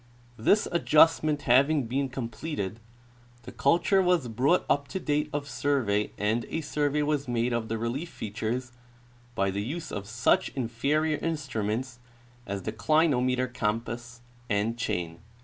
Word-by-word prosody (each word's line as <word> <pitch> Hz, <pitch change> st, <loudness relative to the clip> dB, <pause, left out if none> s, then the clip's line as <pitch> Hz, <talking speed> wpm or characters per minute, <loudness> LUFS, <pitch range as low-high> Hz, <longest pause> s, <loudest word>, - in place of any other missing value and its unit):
This 205 Hz, -, +3 dB
adjustment 155 Hz, -2 st, +4 dB
having 140 Hz, +3 st, +4 dB
been 135 Hz, +4 st, -1 dB
completed, 115 Hz, -, -4 dB, 0.6 s
the -, -, -9 dB
culture 175 Hz, +7 st, +3 dB
was 180 Hz, -7 st, +2 dB
brought 135 Hz, +10 st, +2 dB
up 140 Hz, 0 st, +1 dB
to 190 Hz, -, -4 dB
date 150 Hz, -2 st, 0 dB
of 145 Hz, -1 st, -3 dB
survey 125 Hz, -6 st, 0 dB
and 110 Hz, +3 st, 0 dB
a 165 Hz, -, -2 dB
survey 150 Hz, 0 st, 0 dB
was 145 Hz, -2 st, 0 dB
made 120 Hz, 0 st, 0 dB
of 115 Hz, -1 st, -1 dB
the 115 Hz, -, -1 dB
relief 120 Hz, +9 st, -3 dB
features 110 Hz, +4 st, -4 dB, 0.6 s
by 95 Hz, 0 st, +1 dB
the 100 Hz, +1 st, -2 dB
use 155 Hz, +10 st, -5 dB
of 100 Hz, -1 st, -5 dB
such 115 Hz, +2 st, +2 dB
inferior 140 Hz, +6 st, 0 dB
instruments 130 Hz, -6 st, -2 dB, 0.5 s
as 100 Hz, -1 st, -4 dB
the -, -, -2 dB
clinometer 130 Hz, 0 st, +2 dB
compass 120 Hz, +1 st, -3 dB, 0.3 s
and 105 Hz, +3 st, +1 dB
chain. 85 Hz, -8 st, -3 dB
125 Hz, 140 wpm, -28 LUFS, 110-150 Hz, 0.6 s, adjustment